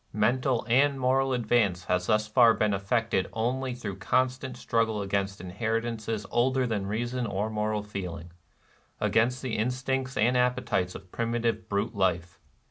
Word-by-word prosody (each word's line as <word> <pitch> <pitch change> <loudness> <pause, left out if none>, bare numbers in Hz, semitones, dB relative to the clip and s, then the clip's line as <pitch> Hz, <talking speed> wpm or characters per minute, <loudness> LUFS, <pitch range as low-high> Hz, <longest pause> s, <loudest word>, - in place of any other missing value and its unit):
Mental 120 +3 +1
and 135 +3 +3
moral 135 +1 +2
advance 110 -7 +1
has 90 0 0
thus 110 -1 +2
far 115 0 +5
been 105 -1 +1
effected 100 0 0
only 125 +3 -1
through 100 -6 -6
constant 130 +4 0
struggle 115 -3 0
against 100 0 -2
inheritances 110 +3 -3
older 130 +2 +2
than 105 -5 -2
reason 120 +3 -2
or 100 +2 -2
moral 105 0 -1
feeling, 90 -5 -6 0.4
— - - -35
against 125 +3 +2
the 125 -4 -2
instincts 130 +2 -1
and 120 +4 +3
the - - +4
appetites 125 -7 0
of 95 - -11
primitive 115 -1 -1
brute 105 +3 -1
life. 90 -4 -1
115 Hz, 150 wpm, -28 LUFS, 100-125 Hz, 0.4 s, far